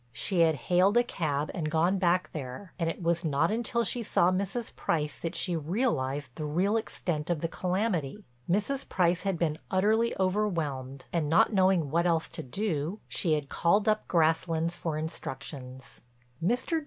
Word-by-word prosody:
She 180 - -1
had 165 -2 +5
hailed 185 - +3
a 240 - +6
cab 155 -10 -2
and 160 -4 -2
gone 170 +5 +2
back 180 0 +2
there 150 +6 -7
and 165 -1 +1
it 170 - -5
was 170 +1 +1
not 160 +2 +1
till 235 0 0
she 235 +3 -1
saw 185 -4 +3
Mrs. 200 +5 -2
Price 150 -2 -1
that 165 - -5
she 180 -2 0
realized 145 - -1
the 155 - -6
real 180 +8 +1
extent 175 -8 -2
of 170 -4 0
the 165 - 0
calamity. 180 -4 -1 0.3
Mrs. 210 +9 0
Price 175 -1 +2
had 195 -3 -1
been 160 -2 0
utterly 215 +5 +2
overwhelmed, 165 -10 -1
and, 160 -4 0
not 220 +7 +4
knowing 185 -6 +3
what 170 +2 +2
else 165 -2 +1
to 165 - -6
do, 165 - -2
she 165 -4 0
had 150 -2 -1
called 200 +9 +2
up 215 0 +1
Grasslands 165 0 +1
for 165 -3 -3
instructions. 135 -4 -7 0.4
Mr. 250 - +1
170 Hz, 170 wpm, -29 LUFS, 155-195 Hz, 0.4 s, a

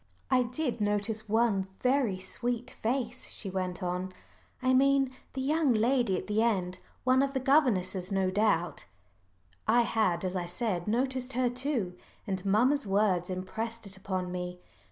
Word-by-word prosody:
"I 255 -1 +5
did 245 -1 -2
notice 210 +1 -1
one 215 -3 +2
very 250 -6 +2
sweet 240 +5 -3
face," 245 +1 -2
she 195 - -3
went 185 0 -3
on, 180 +1 -2 0.5
"I 255 0 +2
mean 270 0 +4 0.2
the 265 - -3
young 290 -2 +2
lady 235 -3 +2
at - - -5
the 210 +1 +1
end 185 -6 0 0.2
one 255 +1 +4
of 275 0 0
the 265 - 0
governesses 205 - +2
no 190 -1 +1
doubt." 195 -4 +1 0.8
I 235 +2 +5
had, 215 -6 +1
as 185 0 -2
I 175 -1 -2
said, 180 -1 -2
noticed 255 +3 0
her 250 -1 +1
too, 245 -8 -1 0.3
and 190 -3 -3
mamma's 235 +6 +3
words 195 -3 +2
impressed 220 +5 -4
it 195 -1 -8
upon 185 -2 -3
me. 180 0 -4
220 Hz, 155 wpm, -30 LUFS, 185-255 Hz, 0.8 s, I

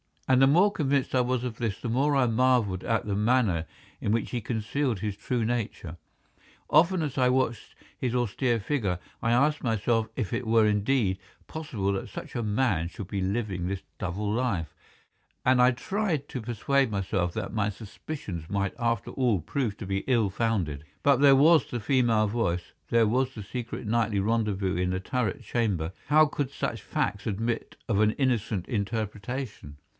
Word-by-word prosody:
And 130 0 +4
the 135 - +7
more 180 +9 +5
convinced 140 -6 0
I 130 - +4
was 125 0 0
of 120 -3 -4
this 115 -5 -2
the 120 - -4
more 140 +5 +2
I 135 -2 +4
marvelled 115 -5 +2
at 115 -1 0
the 100 -1 -1
manner 105 -7 +2 0.3
in 105 - -1
which 115 - -1
he 125 - -1
concealed 115 +1 -1
his 105 -2 -3
true 120 +2 -1
nature. 110 -8 -3 0.7
Often 170 +3 +4
as 145 -3 -4
I 125 - +4
watched 125 -3 -1 0.2
his 125 -1 -2
austere 120 0 +1
figure, 105 -6 -1 0.2
I 115 - +1
asked 145 +5 +3
myself 115 -1 +1
if 115 -7 -2
it 120 0 -2
were 110 -1 +5
indeed 105 -1 +1 0.3
possible 120 -11 -3
that 95 - -4
such - - -8
a 120 - -2
man 105 -6 +1
should 90 +1 -8
be 100 - -2
living 95 -2 -2
this 95 0 -3 0.2
double 100 +3 -2
life, 105 - -1 0.7
and 125 -1 +5
I 125 - +7
tried 160 - -2
to 125 - -4
persuade 120 +4 +1
myself 95 -3 -1
that 110 -2 -4
my 105 -2 +1
suspicions 100 - -7
might 100 -1 -1
after 115 -2 -1
all 120 -9 +1
prove 115 - -2
to 105 - -6
be 95 0 -1
ill 115 -6 +3
founded. 95 -9 -1 0.2
But 140 -1 +5
there 140 -1 +7
was 155 +2 +5
the 120 - -3
female 115 -3 +3
voice, 100 -6 -1 0.2
there 115 -1 +4
was 130 +4 0
the 105 - -6
secret 120 +3 -5
nightly 110 -2 +1
rendezvous 100 -3 0
in 90 0 0
the 95 0 -2
turret 115 0 -2
chamber—how 110 - +1
could 145 -2 -2
such - - -3
facts 100 +2 -2
admit 115 +3 -2
of 100 -3 +2
an 110 0 +4
innocent 110 -8 0
interpretation. 105 - -4
115 Hz, 175 wpm, -27 LUFS, 100-130 Hz, 0.7 s, the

